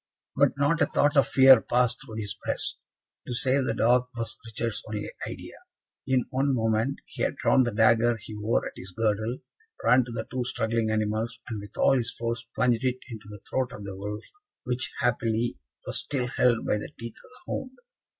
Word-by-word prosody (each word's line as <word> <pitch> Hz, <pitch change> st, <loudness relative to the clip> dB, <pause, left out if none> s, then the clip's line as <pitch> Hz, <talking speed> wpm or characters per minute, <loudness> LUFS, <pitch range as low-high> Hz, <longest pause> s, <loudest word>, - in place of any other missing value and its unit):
But -, -, +4 dB
not 145 Hz, +4 st, +2 dB
a 145 Hz, -, +5 dB
thought 145 Hz, 0 st, +2 dB
of 140 Hz, -4 st, +5 dB
fear 130 Hz, -3 st, +8 dB
passed 125 Hz, 0 st, +1 dB
through 115 Hz, -5 st, -9 dB
his 105 Hz, -2 st, -4 dB
breast; -, -, -1 dB, 0.5 s
to 125 Hz, -, -2 dB
save 130 Hz, +1 st, +2 dB
the 115 Hz, -, 0 dB
dog 125 Hz, +2 st, +3 dB
was 115 Hz, -1 st, -2 dB
Richard's 115 Hz, 0 st, -3 dB
only 105 Hz, -1 st, -3 dB, 0.2 s
idea. -, -, -7 dB, 0.5 s
In 130 Hz, -2 st, +2 dB
one 135 Hz, +1 st, +1 dB
moment 115 Hz, +3 st, 0 dB
he -, -, -9 dB
had -, -, +1 dB
drawn 130 Hz, -, +4 dB
the 120 Hz, -2 st, +1 dB
dagger 115 Hz, +2 st, +4 dB
he 110 Hz, +1 st, -10 dB
wore 105 Hz, +2 st, 0 dB
at -, -, -5 dB
his 95 Hz, 0 st, -9 dB
girdle, 110 Hz, +2 st, 0 dB, 0.5 s
ran 125 Hz, +1 st, +5 dB
to 120 Hz, -, -8 dB
the 115 Hz, -1 st, -4 dB
two 130 Hz, 0 st, -1 dB
struggling 115 Hz, -1 st, 0 dB
animals, 110 Hz, +1 st, -1 dB
and 110 Hz, -4 st, -4 dB
with 100 Hz, -1 st, -12 dB
all 135 Hz, -, +4 dB
his 120 Hz, -2 st, 0 dB
force, 120 Hz, 0 st, -3 dB
plunged 120 Hz, -2 st, +2 dB
it 130 Hz, -1 st, +1 dB
into 110 Hz, -2 st, -8 dB
the 105 Hz, -2 st, -10 dB
throat 130 Hz, -1 st, -1 dB
of 105 Hz, -, -8 dB
the 100 Hz, -1 st, -6 dB
wolf, 105 Hz, +2 st, -5 dB, 0.4 s
which, 125 Hz, +1 st, -2 dB
happily, 115 Hz, -, 0 dB, 0.3 s
was -, -, 0 dB
still 135 Hz, -4 st, -2 dB
held 125 Hz, -1 st, +2 dB
by 105 Hz, -, +1 dB
the -, -, -6 dB
teeth 115 Hz, -1 st, -7 dB
of -, -, -12 dB
the 255 Hz, -, -16 dB
hound. 260 Hz, -1 st, -4 dB
115 Hz, 200 wpm, -27 LUFS, 110-125 Hz, 0.5 s, fear